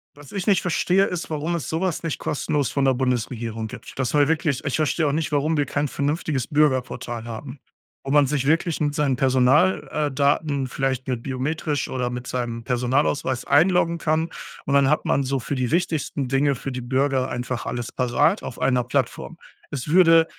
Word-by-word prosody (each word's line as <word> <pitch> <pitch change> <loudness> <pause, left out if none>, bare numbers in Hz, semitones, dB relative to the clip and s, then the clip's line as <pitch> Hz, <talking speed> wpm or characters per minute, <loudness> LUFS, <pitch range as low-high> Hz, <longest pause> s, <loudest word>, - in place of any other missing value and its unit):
was 145 -1 -14
ich 195 -1 -4
nicht 195 -4 +4
verstehe, 180 +2 +2
ist, 180 -3 -4
warum 155 +2 -2
es 165 - -4
sowas 170 +1 -1
nicht 165 -2 -2
kostenlos 145 -1 -1
von 140 - 0
der 135 - +4
Bundesregierung 115 -3 -2
gibt. - - -10
Das 130 - 0
soll 145 -1 +3
wirklich 155 -4 0
ich 145 - 0
verstehe 155 +1 +1
auch - - +1
nicht, 155 +2 -1
warum 150 +2 +1
wir 145 -1 +1
kein 145 +2 -1
vernünftiges 145 -2 -2
Bürgerportal 130 -5 0
haben, 125 +4 -7 0.4
wo 135 - -4
man 145 0 +5
sich 135 -1 -1
wirklich 165 +1 +1
mit 145 -1 0
seinen 145 -5 +1
Personal 135 +7 +3
äh, 150 -1 -1
Daten 140 0 +1
vielleicht 130 0 -2
mit 125 -3 -2
biometrisch 145 +3 -2
oder 125 -1 -2
mit 125 0 -5
seinem 120 -2 -3
Personalausweis 130 +1 0
einloggen 170 +2 +3
kann. 160 +1 0 0.4
Und, 140 - -1
dann 140 -1 +4
hat 155 - +1
man 140 - +2
so 135 +1 -1
für 135 +4 -4
die 130 -2 -1
wichtigsten 155 -4 -1
Dinge 135 +2 +2
für 135 +2 -5
die 125 0 -4
Bürger 130 +1 0
einfach 125 0 -4
alles 120 -1 -4
parat 145 - +2
auf 120 - -7
einer 125 -2 +2
Plattform. 120 - -2 0.3
Es 140 -2 -4
würde 165 0 +6
140 Hz, 190 wpm, -23 LUFS, 130-155 Hz, 0.4 s, würde